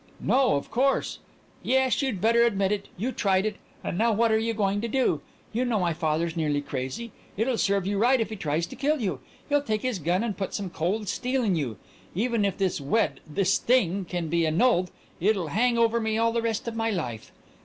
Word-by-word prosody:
"No 260 - +3
of 140 - -4
course 270 +3 +1 0.2
" - - -32
"Yes, 265 0 +2
you'd 260 -9 -1
better 230 +2 +4
admit 200 -4 +2
it! 205 -1 -2
You 235 +8 -1
tried 195 -4 +1
it, 215 -1 -2 0.3
and 175 - -3
now 230 +1 +3
what 225 +1 +2
are 220 - +3
you 225 +1 0
going 205 -2 0
to 235 - -2
do? 260 +2 +1 0.3
Do 230 - -1
you - - +2
know 240 -4 +1
my 175 -2 +1
father's 160 +1 -1
nearly 150 -3 0
crazy? 140 - -5 0.3
It'll 235 +4 +1
serve 200 -2 +1
you 200 0 0
right 250 +4 +4
if 225 -1 -1
he - - -3
tries 165 -4 -1
to - - -10
kill 295 +2 +1
you. 185 - -2 0.3
He'll 290 -1 +2
take 215 -6 -2
his 250 -6 -1
gun 175 +6 +1
and 220 -4 -2
put 195 0 -4
some 195 -4 -4
cold 200 +7 -1
steel 255 +5 -1
in 200 -5 +2
you. 130 -9 -2 0.4
Even 225 +1 +1
if 200 - -1
this 190 -6 0
wed 185 +12 +1
this 185 +5 +1
thing 200 -6 +2
can 175 -1 -3
be 165 +1 +1
annulled 180 +2 +3 0.3
it'll 190 -3 +1
hang 235 +6 +2
over 230 0 +3
me 220 -1 0
all 230 0 +2
the 230 0 0
rest 230 0 -2
of 230 - -3
my 225 0 0
life!" 125 - -4
210 Hz, 230 wpm, -26 LUFS, 175-235 Hz, 0.4 s, better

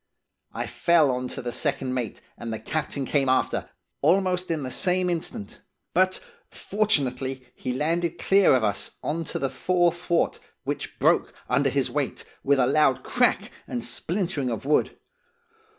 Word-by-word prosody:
I - - -3
fell 165 -5 +3
on 125 0 -2
to - - -5
the 120 - -2
second 135 -2 -1
mate, 125 -4 -3
and 115 -1 -6
the 110 - -2
captain 140 +4 -2
came 135 -1 +1
after, 130 - +1 0.3
almost 180 +3 +2
in 160 -3 -1
the 130 - -4
same 180 +3 +1
instant, 160 - -5 0.3
but, 185 +1 +3 0.3
fortunately, 135 - -1
he 130 - -4
landed 165 +5 0
clear 195 -7 +5
of 125 - +1
us, 105 -2 -2
on 165 +2 -2
to - - -4
the 135 - 0
fore 175 +4 +2
thwart, 175 -1 0 0.2
which - - -4
broke - - +3
under - - +2
his - - 0
weight, - - -2 0.2
with 140 0 +3
a 130 - +4
loud 135 0 +3
crack - - +1 0.2
and 120 - -3
splintering 165 - -2
of 115 +1 -4
wood. 150 +1 +2
145 Hz, 160 wpm, -26 LUFS, 130-175 Hz, 0.3 s, clear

